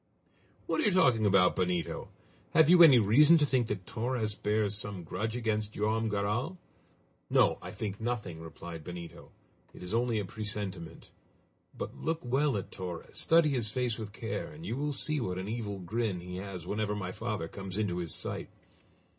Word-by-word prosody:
"What - - 0
are - - 0
you - - +4
talking 130 - +4
about, 95 -2 +4
Benito? 90 -2 -1 0.5
Have 160 0 +7
you 180 -1 +8
any 150 -7 +10
reason 140 +10 +6
to 150 - +3
think 130 -4 +1
that 95 -4 -4
Torres 115 -1 -1
bears 105 0 0
some 100 -3 -5
grudge 105 +7 -3
against 110 -3 -1
Joam 110 +2 0
Garral?" 105 - -1 0.7
"No! - - +4
I - - -7
think 105 0 -5
nothing!" 110 -8 -3
replied 80 0 -8
Benito; 85 -1 -9 0.4
"it - - -10
is 90 - -5
only 120 0 +1
a 105 - -1
presentiment! 100 -5 -6 0.7
But - - -5
look 165 0 -2
well 135 0 +2
at 95 - -6
Torres, 90 -3 -7
study 165 -1 +4
his 120 -6 +2
face 120 0 -1
with 105 -2 -6
care, 115 +2 -4
and 155 +2 -10
you 120 - -2
will 145 +2 -1
see 150 +2 -1
what 90 -5 -2
an 95 +1 -4
evil 105 -3 -3
grin 95 +1 -2
he 90 +1 -7
has 95 -3 -6
whenever 105 +1 -1
my 95 -3 -4
father 105 -6 -3
comes 95 +2 -6
into 100 -5 0
his 85 -2 -3
sight." - - -4
105 Hz, 180 wpm, -31 LUFS, 95-120 Hz, 0.7 s, any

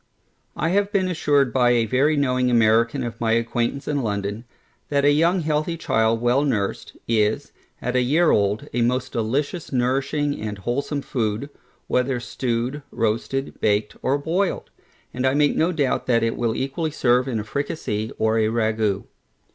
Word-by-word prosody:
I 165 - 0
have 200 +2 +1
been 190 -2 +1
assured 145 -7 +1
by 125 -2 +4
a 115 -1 +2
very 140 +6 +2
knowing 125 -2 +1
American 115 +2 +3
of 120 -1 -6
my 115 -1 +2
acquaintance 115 +4 -1
in 145 -2 0
London, 105 0 -3 0.4
that 140 -1 +2
a 145 - +6
young 170 +5 +3
healthy 155 +2 -1
child 110 -6 +1
well 120 +4 +3
nursed, 105 -9 -2
is, 110 -2 +1 0.3
at 125 +1 -2
a 125 - +4
year 155 +7 +3
old, 100 +1 +1
a 120 - 0
most 125 +2 0
delicious 140 +9 -2
nourishing 135 +3 0
and 105 -1 -4
wholesome 140 +7 -2
food, 115 +3 -2 0.3
whether 125 0 0
stewed, 125 +2 -2
roasted, 115 +5 -2
baked, 105 0 +1
or 135 +2 +1
boiled; 175 +7 -1 0.4
and 125 +1 0
I 130 - +2
make 145 0 +3
no 165 +3 +2
doubt 145 -6 0
that 115 -2 +3
it 115 - 0
will 115 -2 -1
equally 140 +4 -2
serve 125 -3 +2
in 120 -4 -1
a - - -3
fricasee, 110 -3 -3
or 110 +1 +2
a 110 - +2
ragoust. 110 -3 0
125 Hz, 170 wpm, -23 LUFS, 115-145 Hz, 0.4 s, a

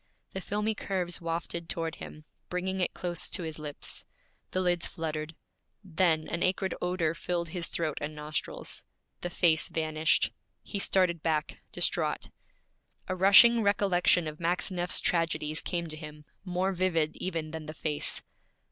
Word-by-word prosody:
The 190 - -3
filmy 210 +3 0
curves 180 -5 -2
wafted 170 0 -3
toward 165 0 -2
him, 155 0 -9 0.2
bringing 190 +1 -2
it 180 - 0
close 175 -1 -1
to 185 - -3
his 160 -1 -5
lips. 150 -1 -3 0.5
The 185 - -1
lids 175 -2 +1
fluttered. 155 -1 -4 0.5
Then 165 -3 +2
an 170 - -3
acrid 190 +1 +1
odor 180 -3 +1
filled 170 0 -2
his 175 0 -4
throat 155 -4 -2
and 150 +1 -4
nostrils. 150 +1 -4 0.4
The 175 - -3
face 165 -3 +3
vanished. 155 0 +2 0.3
He 200 - -3
started 180 -4 +3
back, 155 -2 -1
distraught. - - +1 0.8
A 185 - -1
rushing 215 +5 +8
recollection 190 -4 +3
of 155 0 -6
Maxineff's 175 +1 +2
tragedies 165 -2 +1
came 170 -1 -2
to 155 - -4
him, 150 -1 -9 0.2
more 185 0 0
vivid 170 -4 +1
even 165 -4 -3
than 160 -1 -6
the 155 - -6
face. 150 -2 -1
170 Hz, 145 wpm, -30 LUFS, 155-185 Hz, 0.8 s, rushing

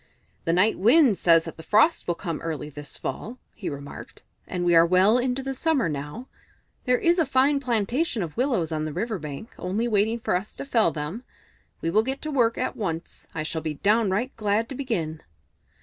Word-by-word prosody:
"The 165 - +2
Night 185 +5 +3
Wind 235 - +5
says 165 -1 +5
that 165 - -8
the - - -8
frosts 220 - +3
will 175 - 0
come 165 -4 -4
early 155 -2 -4
this 145 0 -7
fall," 240 +3 -5 0.2
he 205 - -5
remarked, 140 0 -9 0.2
"and 175 -1 -2
we 175 - +4
are 165 0 +8
well 185 +7 +4
into 255 +1 -1
the 270 0 -3
summer 280 - +1
now. 150 - -5 0.6
There 250 -1 +3
is 340 +5 +2
a - - +5
fine 275 +2 +3
plantation 240 - 0
of 160 -3 -7
willows 235 - 0
on 155 -1 -1
the 155 - -4
river 215 +4 -2
bank, 150 +8 -8
only 200 +6 -1
waiting 220 +1 +1
for 220 - 0
us 190 +4 -4
to - - -6
fell 230 -9 +3
them. 160 +9 -5 0.6
We 165 - -1
will 215 - +4
get 265 +4 -3
to 310 - -3
work 235 -5 +2
at 255 - -2
once. 170 -6 -5
I 155 - -2
shall 160 +1 -3
be 155 -1 -3
downright 210 - +1
glad 215 +1 +1
to - - -5
begin." 175 - -3
210 Hz, 205 wpm, -25 LUFS, 165-250 Hz, 0.6 s, are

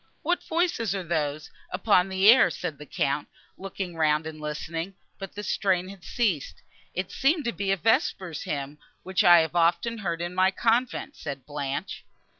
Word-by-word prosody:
"What 350 +3 +1
voices 320 - 0
are 190 - -3
those, 155 -3 -2 0.2
upon 190 0 +2
the 190 +1 +2
air?" 240 +3 +8
said 155 -5 -5
the 150 - -10
Count, 140 +2 -1 0.3
looking 190 -2 -6
round, 155 -1 +2
and 155 -1 -7
listening; 165 +4 -4 0.2
but 195 0 -8
the 210 - -5
strain 185 0 0
had 195 -2 -12
ceased. 200 - -1 0.3
"It 185 0 -3
seemed 300 +3 +1
to 235 - +1
be 200 -1 -1
a 195 - +2
vesper 190 -2 +1
hymn, 145 0 -4 0.2
which 190 0 +1
I 175 -1 +8
have 160 +1 -3
often 175 +7 +2
heard 170 -5 -2
in 175 +1 -4
my 185 +1 +4
convent," 235 +7 0
said 140 -3 -7
Blanche. 145 +4 -4
180 Hz, 175 wpm, -26 LUFS, 155-200 Hz, 0.3 s, air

